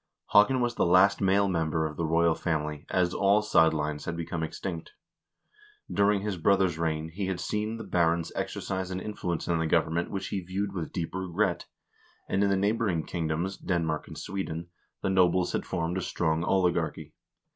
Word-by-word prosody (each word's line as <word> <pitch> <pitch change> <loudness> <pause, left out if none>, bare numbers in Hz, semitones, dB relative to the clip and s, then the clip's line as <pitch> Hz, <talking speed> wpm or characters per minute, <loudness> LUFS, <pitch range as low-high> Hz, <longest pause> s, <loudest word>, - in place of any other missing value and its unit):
Haakon 125 +5 +5
was 120 0 +1
the - - +1
last 90 +5 +5
male 100 +1 +3
member 80 -3 0
of 75 -1 -4
the 80 +1 -1
royal 85 +1 +3
family, 75 -3 -3
as 90 -1 +1
all 100 +1 +3
side 80 -6 +4
lines 75 -1 -3
had 85 0 -3
become 85 0 -3
extinct. 80 +1 -5 1.0
During 100 0 +3
his 100 -2 -3
brother's 90 -1 +2
reign 80 -1 -1
he 95 +4 -4
had 95 -2 -2
seen 105 +5 -2
the 115 - -6
barons 85 -3 +1
exercise 95 -1 -3
an 95 0 -3
influence 90 -5 -4
in 85 -1 +1
the 80 - 0
government 80 +2 +1
which 95 -1 -4
he 100 - -2
viewed 95 +3 -3
with 85 -4 -4
deep 85 -3 -4
regret, 95 0 -1 0.6
and 100 - +1
in 100 - +3
the 100 - +2
neighboring 100 -4 0
kingdoms, 85 +3 -2
Denmark 80 -4 -1
and - - -9
Sweden, 85 -3 -4 0.3
the - - +1
nobles 90 -1 +3
had - - -2
formed 90 0 -1
a - - -3
strong 80 -2 0
oligarchy. 90 -2 0
90 Hz, 180 wpm, -28 LUFS, 80-95 Hz, 1.0 s, Haakon